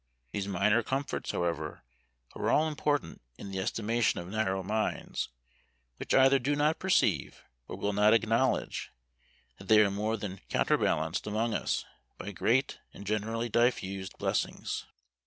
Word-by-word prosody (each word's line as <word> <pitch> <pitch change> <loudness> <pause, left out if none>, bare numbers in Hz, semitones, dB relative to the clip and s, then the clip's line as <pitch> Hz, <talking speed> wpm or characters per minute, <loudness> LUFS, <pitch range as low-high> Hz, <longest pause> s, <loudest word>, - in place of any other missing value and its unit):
These 100 +5 -3
minor 105 +4 +3
comforts, 135 +4 -3
however, 80 -3 -2 0.5
are - - -1
all 155 - +4
important 145 -1 -1 0.2
in 100 - -8
the 95 - -3
estimation 115 +3 0
of 85 - -7
narrow 95 -2 -1
minds; 110 +3 -2 0.7
which - - -1
either 135 +1 +6
do 140 +4 0
not 150 +2 +2
perceive, 190 0 +1 0.2
or - - -6
will 105 - -1
not 105 +1 +5
acknowledge, 115 +3 +1 0.7
that 95 - -12
they 110 +1 +7
are 105 -2 +5
more 105 +3 -1
than 100 -2 -6
counterbalanced 80 +6 +1
among 110 +2 0
us, - - -1 0.3
by 105 - -6
great 125 +8 +1 0.2
and 100 - -9
generally 110 +3 -1
diffused 100 -5 0
blessings. - - -2
110 Hz, 140 wpm, -30 LUFS, 95-120 Hz, 0.7 s, they